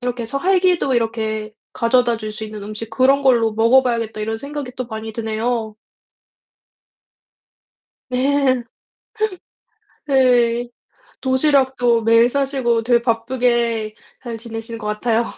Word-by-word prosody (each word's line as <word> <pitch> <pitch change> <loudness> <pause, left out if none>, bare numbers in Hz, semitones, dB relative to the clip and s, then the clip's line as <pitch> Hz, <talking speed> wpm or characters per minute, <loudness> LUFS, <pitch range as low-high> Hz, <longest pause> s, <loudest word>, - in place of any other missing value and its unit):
이렇게 245 -1 -3
서 275 +5 -3
활기도 360 -5 +2
이렇게 220 -2 -2 0.2
가져다 240 0 +2
줄 215 -1 -5
수 215 +1 -6
있는 215 -1 -8
음식 215 +2 -7
그런 265 +4 +3
걸로 235 -4 +3
먹어 230 +4 +4
봐야겠다.' 230 -4 -2
이런 220 +1 -3
생각이 280 -1 -6
또 255 - -4
많이 220 -1 -6
드네요. 220 0 -2 2.3
네. 260 0 +1 1.5
네. 245 -3 +3 0.6
도시락도 260 -3 +2
매일 230 +1 +5
싸시고 265 -3 0
되게 240 +1 +3
바쁘게 235 -2 0 0.3
잘 235 -2 -5
지내시는 225 0 -7
것 215 - -7
같아요. 225 +2 0
235 Hz, 255 characters per minute, -19 LUFS, 225-260 Hz, 2.3 s, 매일